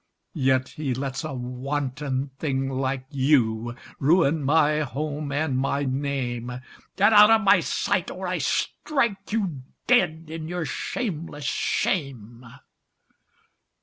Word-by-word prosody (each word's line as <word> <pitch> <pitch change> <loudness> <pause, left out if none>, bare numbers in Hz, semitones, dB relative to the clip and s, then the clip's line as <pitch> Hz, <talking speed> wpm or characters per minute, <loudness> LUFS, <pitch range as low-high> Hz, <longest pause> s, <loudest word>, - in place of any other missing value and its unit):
Yet 130 -4 +1
he 140 -5 -3
lets 135 +3 -3
a 155 - -4
wanton 135 +2 -3
thing 135 -3 -1
like 130 0 -2
you 120 -5 +2 0.2
Ruin 160 +1 +3
my 150 +1 +3
home 150 +1 -3
and 145 -1 0
my 140 +1 0
name! 130 -3 -2 0.4
Get 205 +3 +4
out 210 0 +9
of 225 0 +5
my 200 - +5
sight - - -1
or - - -6
I - - -1
strike 235 -11 -1
you 190 -11 -1 0.2
Dead 175 -10 +2
in 160 -1 -5
your 175 -1 -3
shameless 160 - -4
shame! 125 - -2
145 Hz, 120 wpm, -25 LUFS, 130-160 Hz, 0.4 s, out